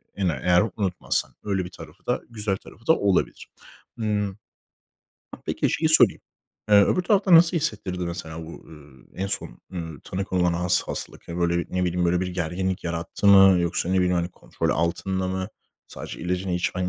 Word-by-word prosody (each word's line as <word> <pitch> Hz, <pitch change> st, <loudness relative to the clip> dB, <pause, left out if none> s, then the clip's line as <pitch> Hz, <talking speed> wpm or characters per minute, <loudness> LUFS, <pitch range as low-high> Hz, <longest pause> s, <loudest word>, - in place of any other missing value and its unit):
ene 95 Hz, -4 st, 0 dB
eğer 90 Hz, +1 st, +4 dB
unutmazsan 95 Hz, -4 st, -1 dB
öyle 95 Hz, -3 st, -1 dB
bir -, -, -7 dB
tarafı -, -, -13 dB
da, -, -, 0 dB
güzel 105 Hz, -4 st, -2 dB
tarafı 115 Hz, +3 st, -17 dB
da 160 Hz, -, +7 dB
olabilir. 100 Hz, -3 st, 0 dB, 0.5 s
Hımm. 105 Hz, -3 st, -1 dB, 1.0 s
Ha, -, -, -10 dB
peki -, -, 0 dB
şeyi -, -, +1 dB
sorayım. -, -, +5 dB, 0.5 s
Eee, 105 Hz, -1 st, +8 dB
öbür 180 Hz, -, +1 dB
tarafta 190 Hz, 0 st, +4 dB
nasıl 165 Hz, +1 st, +6 dB
hissettirdi 105 Hz, -, -2 dB
mesela 80 Hz, -2 st, -6 dB
bu, 80 Hz, -, -9 dB, 0.2 s
eee, 75 Hz, +3 st, -11 dB
en -, -, -1 dB
son, -, -, -4 dB
eee, 90 Hz, -, -3 dB, 0.2 s
tanı 95 Hz, +1 st, -3 dB
konulan 90 Hz, -2 st, +1 dB
has 90 Hz, +1 st, +1 dB
hastalık? -, -, -7 dB
Hani, 85 Hz, +1 st, -5 dB
böyle, 85 Hz, 0 st, +2 dB
bir, 85 Hz, -, -2 dB
ne 90 Hz, 0 st, +1 dB
biliyim, 90 Hz, 0 st, 0 dB
böyle 90 Hz, +1 st, +2 dB
bir 95 Hz, -, -1 dB
gerginlik 90 Hz, +2 st, -2 dB
yarattı 85 Hz, +3 st, -3 dB
mı 95 Hz, -2 st, +8 dB
yoksa, 85 Hz, 0 st, -1 dB
ne 95 Hz, -, +1 dB
bileyim, 90 Hz, -1 st, +2 dB
hani, 85 Hz, 0 st, 0 dB
kontrol -, -, -3 dB
altında 95 Hz, +2 st, -1 dB
mı? 95 Hz, +1 st, -3 dB, 0.4 s
Sadece -, -, -8 dB
ilacını 90 Hz, +2 st, -2 dB
içmen 90 Hz, +1 st, -1 dB
90 Hz, 180 wpm, -24 LUFS, 85-100 Hz, 1.0 s, Eee